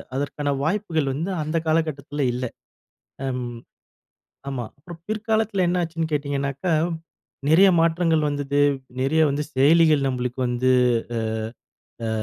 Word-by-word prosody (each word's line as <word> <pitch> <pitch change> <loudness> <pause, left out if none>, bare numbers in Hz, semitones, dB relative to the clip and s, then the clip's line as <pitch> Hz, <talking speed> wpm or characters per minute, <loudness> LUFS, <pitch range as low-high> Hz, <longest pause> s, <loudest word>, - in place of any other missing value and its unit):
அதற்கான 145 +1 -2
வாய்ப்புகள் 160 -4 0
வந்து 165 +8 -3
அந்த 155 +2 -1
காலகட்டத்தில 150 -3 0
இல்ல, 125 +1 -3 0.8
அம் 125 -2 -2 1.0
ஆமா. 130 -3 -3
அப்புறம் 165 +3 -11
பிற்காலத்தில 220 -2 0
என்ன 180 +1 +1
ஆச்சுன்னு 165 -1 -2
கேட்டிங்கனாக்கா, 140 +3 -1 0.8
நிறைய 180 +6 +7
மாற்றங்கள் 165 -1 +2
வந்தது, 145 0 -1 0.4
நிறைய 140 +5 +2
வந்து 145 +2 -1
செயலிகள் 150 +1 +5
நம்மளுக்கு 125 0 -3
வந்து 125 +1 +1 1.4
அ - - -1
150 Hz, 110 wpm, -23 LUFS, 140-165 Hz, 1.4 s, நிறைய